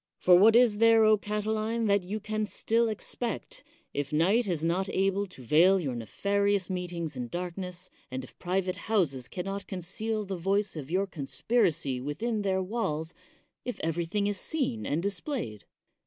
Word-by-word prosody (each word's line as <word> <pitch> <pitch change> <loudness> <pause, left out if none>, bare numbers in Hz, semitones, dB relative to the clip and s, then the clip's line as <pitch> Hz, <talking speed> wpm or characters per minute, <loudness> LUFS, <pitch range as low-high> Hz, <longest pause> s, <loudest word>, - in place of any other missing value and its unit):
For 180 - +6
what 215 +5 +7
is 235 -4 +5
there, 225 0 +6
Catiline, 215 +2 -1
that 200 -1 +3
you 195 +4 -4
can 215 0 -2
still 230 +2 +1
expect, 225 +2 -4 0.3
if 145 -1 -3
night 195 +10 +3
is 170 -4 -1
not 180 +4 0
able 195 +1 +1
to 160 -8 -13
veil 175 +9 +5
your 140 -7 -2
nefari 200 - 0
ous 190 -1 -1
meetings 175 -4 -4
in 125 -1 -4
darkness, 180 +3 -5 0.2
and 130 0 -4
if 130 - -14
private 185 0 -1
houses 140 - +1
can 180 -1 -5
not 195 +1 -4
conceal 215 +4 -3
the 190 -1 -4
voice 195 +3 0
of 145 -3 -6
your 190 +3 +1
conspiracy 160 - +1
with 145 - -5
in 230 -3 0
their 190 -1 0
walls 165 -6 -2 0.3
— - - -46
^if 245 - -4
everything 170 +5 -1
is 205 -1 -1
seen 265 -8 -2
and 155 +4 0
dis 200 -1 -1
played? 115 - -5
190 Hz, 175 wpm, -29 LUFS, 165-215 Hz, 0.3 s, what